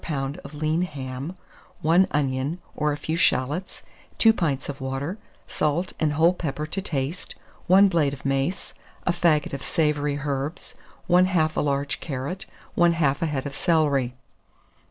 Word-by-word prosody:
of 140 +2 -10
lean 155 +3 0
ham, 140 0 -5 0.5
1 170 +4 +5
onion 135 +2 0 0.2
or 150 0 +1
a 145 - -2
few 160 +2 -2
shalots, 165 +1 0 0.3
2 225 -1 +6
pints 145 - -1
of 140 -1 -6
water, 135 +9 -3 0.3
salt 155 +5 -1
and 155 -2 +1
whole 165 +4 +4
pepper 150 -4 -3
to 195 +5 -3
taste, 150 -2 -3 0.3
1 195 +2 +7
blade 165 -7 +2
of 140 -1 -9
mace, 135 +7 -1 0.3
a - - +3
faggot 165 -5 +2
of 140 - -4
savoury 150 -1 0
herbs, 145 +2 -4 0.3
1/2 175 -3 +3
a - - +1
large 140 -1 -1
carrot, 145 +6 -5 0.3
1/2 165 -5 +3
a 165 - +1
head 145 -3 -2
of 140 - -4
celery. 140 -6 +2
150 Hz, 150 wpm, -25 LUFS, 140-170 Hz, 0.5 s, 1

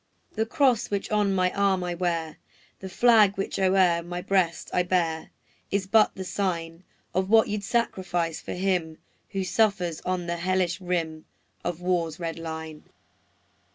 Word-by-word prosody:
The 220 0 -1
cross 260 -4 +2
which 200 0 -3
on 210 -2 +2
my 185 -1 +2
arm 195 -2 +1
I 175 0 -2
wear, 170 -3 -2 0.4
The 190 - -7
flag 215 -2 +5
which 195 - -3
o'er 185 -3 +3
my 175 +1 -5
breast 180 -2 0
I 180 - +3
bear, 175 -3 0 0.4
Is 200 -1 0
but 215 +2 +4
the 190 - -5
sign 170 -3 -3 0.3
Of 185 +2 0
what 220 0 +6
you 210 0 -1
'd - - -13
sacrifice 185 -7 -1
for - - -6
him 180 -4 -1 0.3
Who 195 -1 -2
suffers 185 -4 +1
on 180 -1 -2
the 170 0 -2
hellish 185 +1 0
rim 165 -3 -2 0.4
Of 175 -1 -3
war's 175 -2 -1
red 165 -1 -4
line. 160 -1 -7
180 Hz, 160 wpm, -26 LUFS, 170-195 Hz, 0.4 s, what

